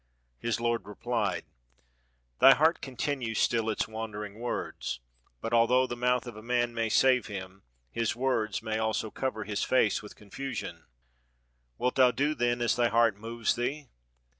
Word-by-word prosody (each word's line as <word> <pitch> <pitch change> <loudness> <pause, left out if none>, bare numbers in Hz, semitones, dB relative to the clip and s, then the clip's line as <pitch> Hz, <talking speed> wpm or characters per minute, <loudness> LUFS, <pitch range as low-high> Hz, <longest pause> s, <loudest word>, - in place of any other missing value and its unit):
His 115 - -1
lord 115 -4 -1
replied, 105 - -2 0.9
"Thy 135 0 +9
heart 160 +4 +3
contmues 130 -4 -3
still 115 -2 +2
its 110 - -1
wan 110 0 -5
dering 105 0 -7
words! 120 - -4 0.4
but 115 - -3
although 125 +2 +4
the 120 - -4
mouth 125 0 +1
of 120 -3 -8
a 110 - -9
man 120 +1 0
may 115 -1 -1
save 130 +1 +4
him, 95 -2 -7 0.3
his 115 - -1
words 115 -5 0
may 110 0 -1
also 110 -1 -1
cover 130 -5 -3
his 105 -1 -3
face 120 -5 +2
with 105 - -11
con 105 -2 -18
fusion. 135 -2 -5 0.9
Wilt 125 0 0
thou 130 -1 +7
do 145 +4 0
then 120 -3 0
as 120 - +2
thy 120 -1 +3
heart 115 -2 +3
moves 115 +2 -1
thee? 135 +4 -3
115 Hz, 165 wpm, -29 LUFS, 110-125 Hz, 0.9 s, Thy